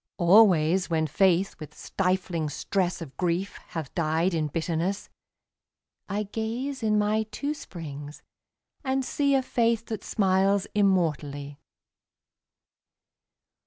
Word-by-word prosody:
Always 185 -2 +5
when 160 -1 +1
Faith 185 +4 +2
with 155 - -10
stifling 180 -4 -1
stress 180 +3 -1
Of 140 -4 -12
grief 180 +2 -1
hath 160 -5 -6
died 165 +2 +1
in 155 -2 0
bitterness, 165 +5 -2 1.0
I 205 +2 -1
gaze 230 +6 -4
in 215 -1 +2
my 210 +1 +1
two 290 +5 -3
springs 150 - -9 0.6
and 265 -1 0
see 280 0 +1
A 265 - +2
Faith 230 -2 +1
that 220 - -5
smiles 195 -1 +2
immortally. 150 -8 0
185 Hz, 110 wpm, -27 LUFS, 160-215 Hz, 1.0 s, Always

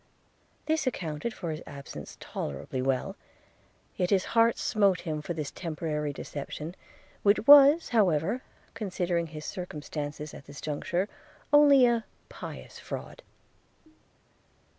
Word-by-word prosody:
This 315 -3 0
accounted 165 -3 -2
for 175 -6 -5
his 155 +1 -5
absence 140 - -9
tolerably 75 - -4
well; 135 +9 -1 0.8
yet 180 -2 0
his 195 -2 +3
heart 230 0 +4
smote 200 -4 +2
him 155 -3 -3
for 170 +3 -4
this 150 -3 -4
temporary 155 -3 -3
deception, 150 +4 -6 0.5
which 205 +2 +3
was 290 +3 +8
however, 195 - +2 0.3
considering 180 -5 -1
his 155 0 -8
circumstances 150 -3 -5
at 140 - -11
this 140 0 -10
juncture, 175 +5 -2 0.5
only 285 -3 +8
a 235 -2 +2 0.3
pious - - -9
fraud. - - -7
175 Hz, 120 wpm, -29 LUFS, 150-220 Hz, 0.8 s, was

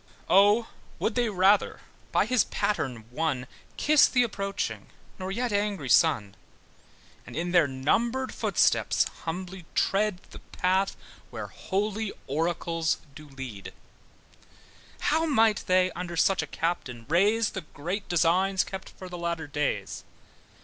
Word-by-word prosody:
O 205 +4 +5 0.3
would - - -1
they 240 -2 +1
rather 195 +1 +3 0.3
by - - +3
his 245 -1 +3
pattern 130 - -2
won 135 -2 -1 0.3
Kiss 300 0 +5
the 250 -1 +3
approaching, 200 -3 -3 0.3
not 185 - -4
yet 235 +3 -2
angry 200 -9 -1
Son; 115 -13 +3 0.9
And - - -9
in 175 +2 -2
their 175 -4 +5
numbered 230 - 0
footsteps - - +2 0.2
humbly 180 +1 -5
tread 200 -2 +1
The - - -10
path 190 +2 0 0.3
where - - -6
holy 210 +2 -2
oracles 165 +2 -1 0.2
do 150 0 -12
lead; 130 -8 -8 1.3
How 320 +2 +2
might 225 -7 +3
they 185 0 +3
under 175 -1 -6
such 190 +2 +3
a 160 - -5
captain 135 -9 -3
raise 205 +7 +3
The 195 - -5
great 175 +6 -5
designs 180 +3 +3
kept 190 -1 -7
for 185 - -11
the 175 -1 -7
latter 170 -2 -2
days! 150 0 -2
185 Hz, 130 wpm, -27 LUFS, 160-210 Hz, 1.3 s, O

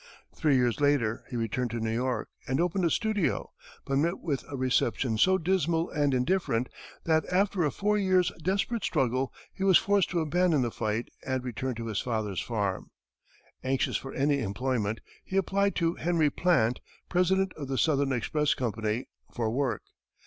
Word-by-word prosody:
Three 150 -4 +2
years 125 +1 +1
later 135 -6 +2
he 125 - -6
returned 120 +2 -1
to 115 +1 -3
New 110 0 -1
York, 125 +2 -1 0.2
and 130 +2 0
opened 180 +1 +1
a - - +3
studio, 215 -2 0 0.3
but 135 0 +1
met 170 +5 +1
with 145 -6 -2
a 140 - -5
reception 125 -2 +1
so 190 +8 +5
dismal 170 -2 0
and 145 -2 +1
indifferent 125 -3 0 0.3
that, 160 -1 +2
after 190 0 +2
a 150 - +2
four 210 +7 0
years' 185 -3 +3
desperate 200 +5 0
struggle, 130 -3 0 0.2
he 190 - -5
was 190 -2 +7
forced 200 -2 +2
to 175 - 0
abandon 160 -2 +2
the 120 - -1
fight 110 +2 -2
and 130 -1 -2
return 125 +1 -3
to 115 0 -5
his 110 -3 -2
father's 110 -6 -2
farm. 100 -5 -2 0.7
Anxious 130 0 0
for 135 - -3
any 140 +1 +2
employment, 115 -1 -1 0.2
he 190 - -3
applied 200 +1 +1
to 170 -1 +1
Henry 165 -4 +1
Plant, 130 -10 +2 0.3
President 190 +1 +2
of 145 -3 -7
the 135 0 -2
Southern 140 -3 +2
Express 145 +4 +1
Company, 110 -1 -2 0.3
for 115 -2 -1
work. 130 0 -1
140 Hz, 170 wpm, -28 LUFS, 120-175 Hz, 0.7 s, was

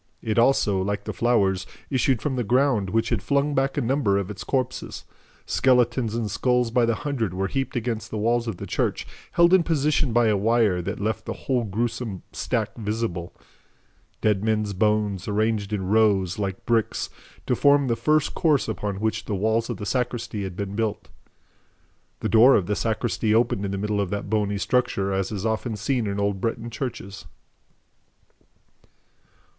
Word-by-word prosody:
It 110 +1 +1
also, 110 -6 +3
like 100 +1 -2
the - - -5
flowers, 100 -6 +1 0.2
issued 130 -2 +1
from 140 -3 -1
the 125 - -1
ground, 120 -3 +2
which 115 +3 0
had 115 -5 0
flung 140 +1 +1
back 135 +1 0
a - - +2
number 120 -5 +1
of 100 0 -2
its 95 -2 -7
corpses. 130 -2 -3 0.4
Skeletons 120 -3 +2
and 110 -4 -2
skulls 125 0 +1
by 120 0 +3
the 115 - +2
hundred 115 -9 -2
were 95 +1 -1
heaped 135 +5 -3
against 115 -2 -2
the 110 - -4
wall 115 +3 +2
of 95 - -5
the - - -6
church, - - -1 0.3
held 170 +1 +5
in 190 - +7
position 150 -4 +1
by 120 +1 +3
a 110 -2 +3
wire 105 -3 +2
that 95 +3 -4
left 110 +1 -2
the - - -3
whole 125 -3 +1
gruesome 115 -1 -3
stack 110 -4 -2
visible. 105 -6 -3 0.9
Dead 105 -2 +1
men's 105 -2 0
bones, 105 -1 0
arranged 105 0 0
in 100 -3 -2
rows, 100 -3 +2
like 95 -2 -3
bricks, 115 -2 0 0.3
to - - +1
form 140 0 +4
the 115 - +1
first 150 +6 +1
course 155 -6 +2
upon 105 -3 -3
which 110 0 -1
the 105 - -2
walls 110 +4 0
of 120 - -3
the 105 - -6
sacristy 120 -2 -2
had 95 -2 -5
been 100 0 -4
built. 110 -1 -2 1.1
The - - -1
door 120 +4 +7
of 95 - +2
the 105 +3 -1
sacristy 110 0 0
opened 110 -3 +1
in 95 - -3
the 100 - -2
middle 105 +1 -1
of 100 - -2
that 100 0 -4
bony 105 -2 +1
structure, 100 -4 0
as 95 +1 -1
is 105 0 -4
often 110 +1 -1
seen 115 +2 -1
in 100 0 -2
old 100 -1 -1
Breton 115 +1 -3
churches. 100 - -6
110 Hz, 180 wpm, -24 LUFS, 100-125 Hz, 1.1 s, in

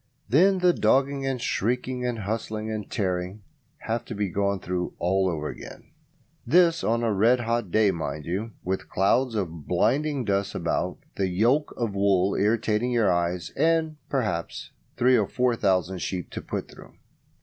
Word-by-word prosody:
Then 185 - +4
the 180 -1 +4
dogging 135 +4 +2
and 130 -2 -1
shrieking 125 +2 -1
and 120 -1 -2
hustling 110 +1 -3
and 105 -2 -5
tearing 95 0 -2 0.4
have 115 +1 -2
to 115 - -6
be 100 -1 -1
gone 100 +1 0
through 90 -1 -3
all 95 +2 +1
over 75 -3 -3
again. - - -10 0.5
(This 165 +4 +4
on 115 +1 +1
a 115 -2 +1
red 115 +5 +3
hot 115 -3 -1
day, 105 +2 +3
mind 75 -4 -4
you, 95 +7 -3
with 95 +1 -3
clouds 115 +6 +2
of 85 -7 -4
blinding 145 -2 +1
dust 100 -1 -1
about, - - -1 0.2
the 95 - +1
yolk 115 +11 +2
of 115 -4 -2
wool 100 -1 +2
irritating 110 +3 +1
your 115 -6 +2
eyes, 85 0 -1
and, 160 -1 +1
perhaps, 105 -12 -2 0.3
three 125 +1 +4
or 105 -5 +2
four 125 -1 +1
thousand 95 -3 0
sheep 90 -3 -4
to - - -5
put - - -4
through). - - -15
110 Hz, 165 wpm, -26 LUFS, 95-125 Hz, 0.5 s, Then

